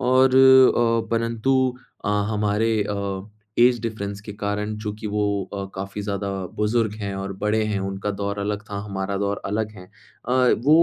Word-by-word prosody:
और 130 +1 +4
अ, 130 -4 +6
परंतु 115 +3 +1 0.5
अ, - - -1 0.2
हमारे 105 +1 +1
अ, 100 -1 -3 0.3
ऐज 120 0 +5
डिफरेंस 100 -3 -4
के 105 0 -8
कारण। 105 +1 -3
चूँकि 105 0 -5
वो 105 0 0 0.3
अ, 100 - -3
काफ़ी 100 +2 -5
ज़्यादा 100 0 -3 0.3
बुज़ुर्ग 105 0 +1
हैं 100 -1 -3
और 95 0 -4
बड़े 110 +1 +2
हैं 105 -2 -1
उनका 95 +1 -3
दौर 100 0 -3
अलग 105 +1 -2
था, 100 - -3
हमारा 95 0 -2
दौर 100 0 -1
अलग 105 +2 -1
है। 90 -1 -12 0.4
अ, - - +1 0.3
वो 155 +4 +7
105 Hz, 165 wpm, -23 LUFS, 100-115 Hz, 0.5 s, वो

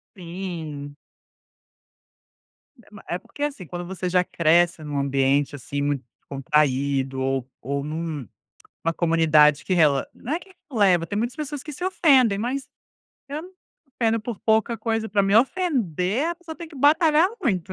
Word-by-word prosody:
Sim. 165 -5 -6 1.9
É - - -26
ma 205 - -13
é 175 - -1
porque, 290 - -8
assim, 275 -11 -3
quando 175 +2 -6
você 185 0 -4
já 180 0 +3
cresce 170 0 +2
em 150 - -8
um 145 -1 -2
ambiente 140 +1 +1
assim 140 +2 -4
muito 145 -2 -1 0.2
descontraído 135 -1 0
ou 135 -1 -1
ou 140 +1 -3
em 150 - -5
um, 160 - -4 0.6
uma 165 - +2
comunidade 155 -3 +4
que 185 - 0
rele 145 -5 +4
não 270 - -6
é 330 - +1
que 375 +1 -18 0.2
releva, 185 -7 +3
tem 205 +5 -3
muitas 240 +2 -2
pessoas 295 -2 -5
que 300 - -8
se 355 +6 -6
ofendem, 265 - +4
mas 260 +4 -3 0.6
eu 285 - -5
não 360 - -11
me - - -30 0.5
ofendo 225 -1 +2
por 225 -2 -6
pouca 220 +1 +2
coisa, 225 -1 -1
para 200 0 +2
me 195 +1 +2
ofender 250 - +1
a 345 - -1
pessoa 335 -2 -10
tem 335 -2 -8
que 305 - -13
batalhar 315 +4 +4
muito. 190 - -1
180 Hz, 175 wpm, -24 LUFS, -, 1.9 s, comunidade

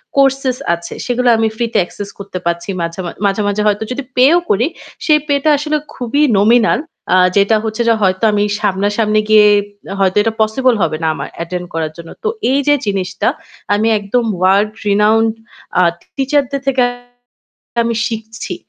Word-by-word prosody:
courses 270 -2 +2 0.2
আছে 170 0 -6
সেগুলো 250 0 0
আমি 225 - +2
free 235 0 -1
তে - - +2
access 200 +2 -8
করতে 200 -2 -6
পারছি। 170 +2 -2
মাঝে, 170 +2 -4
মাঝ 170 - -5
মাঝে, 200 +1 +1
মাঝে 205 +1 0
হয়তো 210 +1 +1
যদি 270 +2 -3
pay 255 +2 +6
ও - - +3
করি 225 +6 +2 0.4
সেই 305 -1 +4
pay 285 -1 +2
টা 310 - +3
আসলে 300 +1 -2 0.2
খুবই 255 +4 -1 0.2
nominal 225 +3 +4 0.4
আ - - +5 0.2
যেটা 200 +2 +4
হচ্ছে 220 +1 -3
য - - +5
হয়তো 185 +1 +1
আমি 205 0 +1 0.2
সামনা-সামনি 205 +2 +1
গিয়ে 215 -1 +7 0.5
হয়তো 190 0 +2
এটা 225 0 0
possible 240 +3 +2
হবে 155 -2 0
না - - +1
আমার - - -6
attend 180 +1 -5
করার 160 -1 -2
জন্য। 165 -1 -10
তো - - -1 0.2
এই 275 - +2
যে 290 - +6
জিনিসটা 195 -3 -2 0.5
আমি 210 +2 +1
একদম 205 +4 0 0.2
world 200 +3 +3 0.2
renowned 220 +2 +3 0.4
আ - - +5 0.3
teacher 275 +1 +1
দের 275 -1 -2
থেকে 265 -2 +2 1.0
আমি 230 0 -1
শিখছি 225 +7 -6
215 Hz, 175 wpm, -15 LUFS, 195-250 Hz, 1.0 s, গিয়ে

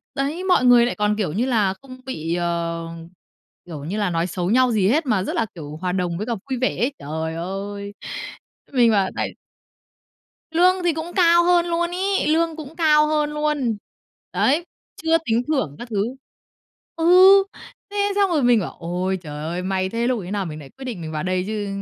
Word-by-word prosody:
đấy, 290 +6 -2
mọi 360 -9 +3
người 245 -1 +7
lại 245 - -2
còn, 210 0 +1
kiểu 190 -8 -1
như 225 +7 0
là, 215 -7 +2
không 255 -1 -12
bị, 165 -10 -3
ờ, 170 -1 -2 0.8
kiểu 155 -5 -8
như 190 +7 -3
là, 205 -3 0
nói 170 0 0
xấu 180 +1 -2
nhau 255 +1 +4
gì 205 -4 +2
hết, 305 +7 +2
mà 215 -7 +1
rất - - -3
là, - - +1
kiểu, 150 -3 -8
hòa 180 +2 -2
đồng 180 -2 -1
với 210 - -3
cả 235 - -1
vui 260 - -1
vẻ 255 - 0
ấy. 250 +5 0
Trời 160 +2 -4
ơi! 200 +3 -5 0.8
Mình 240 -3 +5
bảo 195 -3 +2
tại - - -1 1.2
Lương 365 +3 +3
thì 345 -2 +2
cũng 320 +2 -5
cao 345 -2 +5
hơn 350 0 +4
luôn 340 0 -1
ấy, 385 +1 0
lương 325 +1 +2
cũng 310 -1 -9
cao 305 -2 +4
hơn 300 -1 0
luôn, 300 -7 -1 0.6
đấy, 310 +6 +2 0.4
chưa 325 0 +4
tính 230 -1 +1
thưởng 265 - -1
các 240 - -7
thứ. 205 -2 0 0.9
Ừ, 370 +4 +7 0.5
thế 410 0 0
xong 400 -1 +3
rồi 300 -5 +2
mình 240 -2 +5
bảo: 180 - -5
"Ôi 180 +3 -2
trời 150 -4 -8
ơi, 175 +2 -3
may 190 0 -1
thế, 230 +3 -1
lúc 250 -2 +1
ấy 185 0 -7
nào 200 -2 -1
mình 155 -2 -6
lại 140 -3 -11
quyết 265 - -8
định 230 -9 -5
mình 160 -1 -6
vào 155 -1 -3
đây 185 0 0
chứ. 210 -1 -3
230 Hz, 205 wpm, -22 LUFS, 180-305 Hz, 1.2 s, người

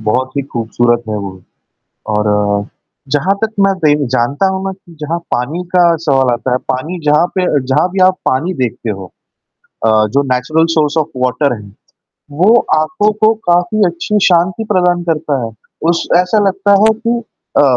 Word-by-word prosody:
बहुत 125 +4 -1
ही 140 - 0
खूबसूरत 120 +1 0
है 105 - -2
वो, 95 -2 -7 0.7
और 105 -1 0 0.5
जहाँ 180 +7 +2
तक 220 - +1 0.2
मैं 195 - +2
बेन 145 -2 +2
जानता 130 +8 0
हूँ 190 0 -3
ना 195 - -2
कि 185 -3 -17
जहाँ 160 +3 -2 0.2
पानी 145 +9 -2
का 175 -2 +5
सवाल 135 -3 +2
आता 125 +1 -2
है, 125 - +2
पानी 155 +8 -4
जहाँ 150 +3 +3
पे 185 - +1
अ, 145 - +2
जहाँ 135 +7 +1
भी 190 +1 -2
आप 185 0 +2
पानी 140 +8 0
देखते 125 -4 -3
हो। 95 -2 -6 0.8
अ, - - +4 0.2
जो 140 +1 +3
नेचुरल 155 +6 +1
सोर्स 155 -1 +1
ऑफ़ 155 -1 +1 0.2
वाटर 130 +2 +1
है। 105 -1 -12 0.6
वो 185 +11 +4 0.2
आँखों 205 +7 +1
को 220 - +6 0.2
काफ़ी 180 +5 +2
अच्छी 175 +5 -1
शांति 180 +4 +2
प्रदान 180 -2 +2
करता 150 -5 -1
है 115 - -5 0.4
उस 170 - -1
ऐसा 180 +4 +2
लगता 195 +1 +1
है 220 - +5
कि 235 0 0 0.4
अ, - - +6
150 Hz, 175 wpm, -14 LUFS, 125-180 Hz, 0.8 s, को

